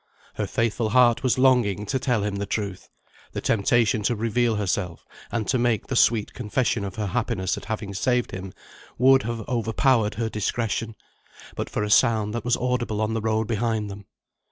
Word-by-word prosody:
Her - - -3
faithful 115 0 0
heart 120 0 +4
was 130 -2 +1
longing 120 -6 +3
to 130 +6 -1
tell 120 -5 0
him 100 -1 -2
the 100 0 -3
truth. 100 -4 -4 0.4
The - - -3
temptation 110 0 +2
to 120 +3 0
reveal 115 +1 +1
herself, 95 -3 -2 0.3
and 115 -3 -2
to 130 - +1
make 120 -3 +1
the 130 - -3
sweet 115 -3 +3
confession 120 -1 -1
of 95 -1 -5
her 110 - -2
happiness 105 -4 -1
at - - -9
having 110 -3 -4
saved 125 +4 0
him, 95 0 -6 0.5
would 135 +2 +5
have 115 -2 -5
overpowered 115 -1 +1
her 115 0 -1
discretion, 115 +1 -2 0.6
but - - -4
for 105 - -2
a 105 - -2
sound 110 -1 +3
that 120 -2 -3
was 120 0 +1
audible 120 -3 -1
on 110 +1 0
the 115 - -1
road 110 0 0
behind 110 -2 -1
them. 100 0 -10
110 Hz, 185 wpm, -24 LUFS, 105-120 Hz, 0.6 s, would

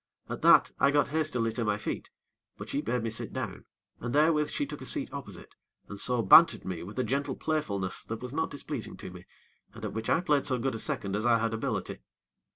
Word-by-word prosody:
At - - -5
that, - - +6
I 140 - +5
got 145 0 +2
hastily 140 -7 0
to 115 - -2
my 105 -2 +1
feet; - - -5 0.5
but - - -8
she - - -1
bade 120 +1 -1
me 115 - -2
sit 115 0 -4
down, 105 -8 -5 0.3
and 120 +2 -3
therewith 150 0 +3
she 290 - -1
took - - -8
a - - -7
seat 285 - -2
opposite, 110 -11 -9 0.3
and 105 - -8
so 125 +1 +2
bantered 115 - +7
me 90 -3 -4
with 100 +7 -9
a 130 - +1
gentle 135 +5 -1
playfulness 100 -13 -2
that 115 0 -5
was 125 +1 -6
not 160 +2 0
displeasing 145 -4 -5
to - - -8
me, 90 0 -12 0.5
and - - -7
at - - -4
which 110 0 -4
I - - +4
played 145 -6 +1
so 130 -3 +1
good 130 +2 -1
a 115 - -4
second 100 -2 -3
as 110 +3 0
I 115 -1 +5
had 115 0 -1
ability. 110 - -3
120 Hz, 230 wpm, -29 LUFS, 110-145 Hz, 0.5 s, bantered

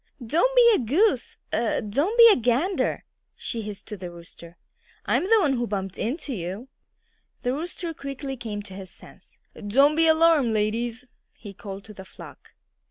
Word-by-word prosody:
"Don't 345 - +1
be 475 -1 +7
a - - +2
goose 295 - +1 0.2
er 230 0 0
don't 285 - -1
be 465 -1 +10
a - - +5
gander!" 255 - 0 0.3
she 230 - -5
hissed 205 -1 -8
to 210 - -6
the 180 -1 -7
Rooster. 170 0 -14 0.5
"I'm - - +1
the 450 - +6
one 270 -6 +1
that 240 - -1
bumped 195 -2 -4
into 280 +5 -3
you." 195 +6 -6 0.7
The 245 - 0
Rooster 335 +3 -5
quickly 275 -1 -6
came 215 -4 -6
to 195 - -12
his 190 -1 -9
senses. - - -14 0.2
"Don't 275 +9 +3
be 325 0 +3
alarmed, 320 -6 +4
ladies!" 230 +3 -1 0.3
he 205 -3 -11
called 195 -1 -9
to 215 - -12
the 190 - -10
flock. - - -14
240 Hz, 170 wpm, -25 LUFS, 205-315 Hz, 0.7 s, be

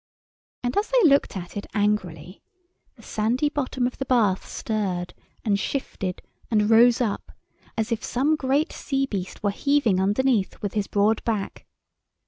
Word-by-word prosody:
And 245 +1 -1
as 415 - +2
they - - +5
looked 280 -8 +3
at 175 -1 -8
it 205 - -5
angrily, 185 -5 -1 0.5
the - - -18
sandy 240 +7 0
bottom 260 -3 -1
of 250 - -3
the 270 - -2
bath 220 -7 +2
stirred 190 -5 -2 0.3
and 200 -2 +2
shifted 200 -7 -3 0.3
and 210 -1 +2
rose 235 +2 +6
up, 220 -5 -2 0.5
as 220 +1 -1
if 230 - -1
some 280 +5 +1
great 285 +2 0
sea 270 -1 -1
beast 195 -7 -5
were 205 - +2
heaving 265 -5 +2
underneath 210 +1 +1
with 205 -2 -4
his 205 -2 -1
broad 210 +2 +2
back. 215 -4 -3
220 Hz, 155 wpm, -24 LUFS, 200-265 Hz, 0.5 s, rose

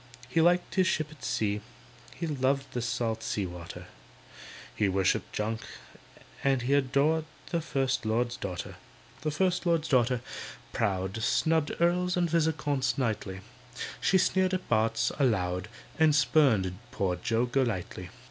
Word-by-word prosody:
He 145 +6 +2
liked 175 +2 +3
his 185 -1 +3
ship 155 -4 0
at 155 - -15
sea, 105 -1 0 0.5
He 170 - -3
loved 135 -2 0
the 120 - -1
salt 115 -2 -1
sea 105 -3 -2
water, 90 -1 -8 0.9
He 105 - +2
worshipped 95 0 +1
junk, 110 +1 -2 0.8
and 135 -3 +2
he 135 +3 +1
Adored 145 +3 +2 0.3
the 170 - +1
First 135 -5 0
Lord's 115 +2 0
daughter. 90 -2 -5 0.4
The 155 - 0
First 180 +4 +1
Lord's 165 -2 +2
daughter, 125 -3 +2 0.5
proud, 95 -1 -1
Snubbed 160 +6 +2
Earls 180 +1 +2
and 175 -1 +2
Viscounts 155 -4 +1
nightly; 105 -6 -2 0.6
She 190 - +3
sneered 185 0 +2
at 185 - -5
Barts. 115 0 +2
aloud, 95 -7 +1 0.3
And 155 -2 +5
spurned 130 - +3
poor 95 -2 -1
Joe 115 +5 +1
Golightly. 115 -8 -2
130 Hz, 140 wpm, -29 LUFS, 110-160 Hz, 0.9 s, And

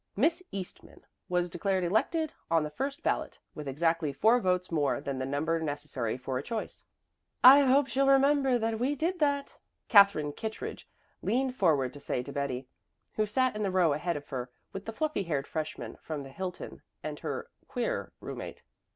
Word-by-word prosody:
Miss 325 - +2
Eastman 190 -2 -8 0.2
was 180 0 +1
declared 185 +2 -1
elected 290 - +1 0.2
on 165 -1 +3
the 150 - -4
first 275 - -4
ballot, - - -1 0.2
with 150 -2 -7
exactly 165 +2 +1
four 225 - +4
votes 180 -4 0
more 150 -4 +1
than 140 -2 -4
the 130 - -2
number 155 +4 0
necessary 145 -7 -3
for 130 0 -3
a - - -3
choice. 220 +9 -5 0.6
"I 265 +3 +11
hope 275 0 +5
she'll 275 +1 +1
remember 275 -1 +4
that 225 -1 -1
we 270 +4 +1
did 345 +5 -1
that," 285 -2 0 0.3
Katherine 200 -9 +6
Kittredge 220 +6 -6 0.3
leaned 255 +1 0
forward 145 - +2
to 145 - -10
say 130 -3 -2
to 140 - -8
Betty, 135 -2 -2 0.5
who 215 0 0
sat 255 +2 +1
in 215 - -3
the 200 - +1
row 180 -5 +3
ahead 160 +3 -1
of 145 - -9
her 125 -2 -4 0.2
with 195 0 -6
the 225 - -4
fluffy 300 0 -1
haired 150 -7 -1
freshman 155 +1 -5
from 150 -3 -5
the 135 - -10
Hilton 180 +4 -6 0.2
and - - -5
her - - -5 0.2
"queer" - - -2
roommate. - - -7
180 Hz, 180 wpm, -30 LUFS, -, 0.6 s, I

